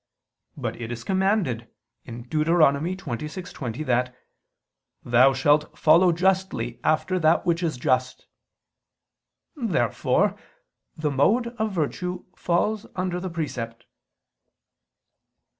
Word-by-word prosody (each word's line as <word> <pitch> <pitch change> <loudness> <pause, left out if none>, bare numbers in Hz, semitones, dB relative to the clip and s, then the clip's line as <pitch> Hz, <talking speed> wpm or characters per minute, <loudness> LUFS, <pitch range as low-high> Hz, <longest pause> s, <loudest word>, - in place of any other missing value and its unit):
But - - -4
it 115 0 -5
is 115 -1 -6
commanded 190 - 0 0.4
(Deut. 125 +6 -3
26:20) 155 - -1
that 125 0 0 0.9
"thou 125 +3 +5
shalt 145 +3 +1
follow 170 +3 +5
justly 180 -9 0
after 185 +4 +1
that 160 0 +3
which 170 0 +1
is 160 -6 -1
just." 130 -1 0 1.3
Therefore 195 - +1 0.6
the 155 -1 -1
mode 220 - +2
of 220 -2 -1
virtue 180 +2 -3
falls 205 +5 0
under 180 -1 -2
the 185 +1 -4
precept. 120 -8 -5
155 Hz, 95 wpm, -24 LUFS, 125-185 Hz, 1.3 s, thou